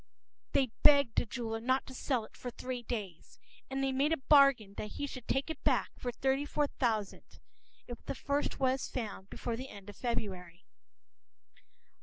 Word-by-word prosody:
p> - - +4
They 245 - -16
begged 280 -5 +6
the - - -3
jeweler 225 -1 -3
not 260 +3 +2
to 265 - -10
sell 255 -3 -1
it - - -18
for 250 - -5
three 250 +1 -5
days. 205 -8 -6 0.3
And 270 0 -1
they 270 - +2
made 275 +4 +2
a 325 - +3
bargain 270 -7 +5
that 210 - -5
he 285 - -3
should 255 -4 -8
take 270 +4 0
it 320 - -8
back - - +2
for 245 - -3
thirty 265 +3 +1
four 290 0 +1
thousand, 220 -8 -2 0.5
if 240 -1 -8
the - - -3
first 285 +2 -1
was 260 0 +1
found 210 -5 -5
before 235 - -3
the 260 +3 -6
end 200 0 -9
of - - -17
February. 190 -6 -4
250 Hz, 185 wpm, -33 LUFS, 220-270 Hz, 0.5 s, begged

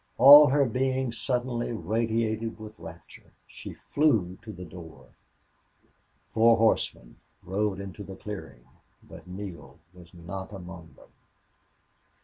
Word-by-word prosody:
All 145 +4 +10
her 140 +1 +3
being 130 +1 -1
suddenly 120 0 -2
radiated 110 +2 -2
with 110 0 -9
rapture. 80 0 -13
She - - -10
flew 110 - 0
to 115 -1 -9
the 90 -3 -9
door. 80 -1 -12 1.2
Four 115 +1 +5
horsemen 110 - 0 0.3
rode 100 +1 -1
into 100 +1 -8
the 95 -1 -9
clearing, 80 -12 -9 0.4
but - - -14
Neale 90 -7 -9 0.2
was 90 -2 -16
not 95 +3 -8
among 85 -5 -10
them. - - -19
105 Hz, 120 wpm, -27 LUFS, 90-115 Hz, 1.2 s, All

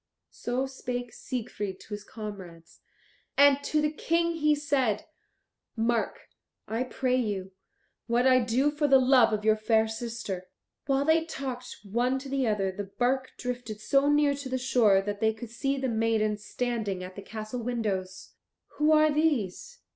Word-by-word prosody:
So 250 +2 -2
spake 245 -3 -5
Siegfried 210 -7 -5
to - - -16
his 205 -1 -5
comrades. 190 -7 -9 0.6
And 285 0 +6
to 305 +1 +1
the 300 - +2
King 335 +2 +1
he 300 -1 +3
said, 270 -8 0 0.7
"Mark, 230 0 0 0.5
I 225 +2 -2
pray 255 0 0
you, 200 -6 -2 0.6
what 240 +1 +2
I 255 -1 +6
do 250 +5 +2
for 295 0 0
the 270 -1 +7
love 255 -3 +5
of 210 0 -2
your 220 0 +5
fair 220 0 +2
sister." 220 -5 -5 0.4
While 275 0 +2
they 320 +1 +4
talked 255 -5 -6
one 240 +6 0
to 270 +1 -7
the 270 -2 0
other 200 -3 +1
the 200 +2 -5
bark 255 +6 -1
drifted 245 -4 -5
so 275 +6 +2
near 295 -1 +4
to 280 -1 -6
the 260 - -1
shore 230 -6 +4
that 205 0 -4
they 220 0 +2
could 225 0 -9
see 275 +3 -1
the 265 -1 -1
maidens 220 -2 0
standing 215 -5 -2
at 185 0 -9
the 200 - -7
castle 215 +4 -6
windows. 200 -6 -3 0.5
"Who 300 +1 +4
are 310 0 +5
these?" 300 - -1
240 Hz, 165 wpm, -28 LUFS, 215-270 Hz, 0.7 s, the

